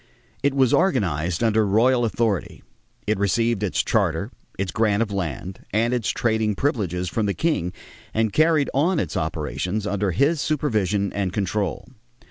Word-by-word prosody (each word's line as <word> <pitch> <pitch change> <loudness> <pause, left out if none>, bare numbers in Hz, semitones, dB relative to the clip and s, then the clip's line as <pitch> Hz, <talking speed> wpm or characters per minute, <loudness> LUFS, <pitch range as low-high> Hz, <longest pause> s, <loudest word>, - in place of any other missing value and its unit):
It 140 -1 +1
was 130 -3 +3
organized 90 - +1
under 110 -1 +3
royal 120 +5 +3
authority; 110 -4 -1 0.4
it 105 -2 0
received 115 +2 +1
its 105 -4 0
charter, - - 0 0.3
its 95 -2 -2
grant 110 0 +2
of 110 - -6
land, 90 -1 -4
and 115 +4 +1
its 115 -6 0
trading 110 -2 0
privileges 95 - -1
from 105 +3 -1
the 100 - -1
king 150 - 0 0.4
and 110 -1 0
carried 155 -2 +3
on 160 +6 +2
its 85 -6 -3
operations 80 - -2
under 100 -1 0
his 140 - +2
supervision 105 -10 0
and 100 -3 -1
control. 100 -1 -2
105 Hz, 150 wpm, -23 LUFS, 95-120 Hz, 0.4 s, was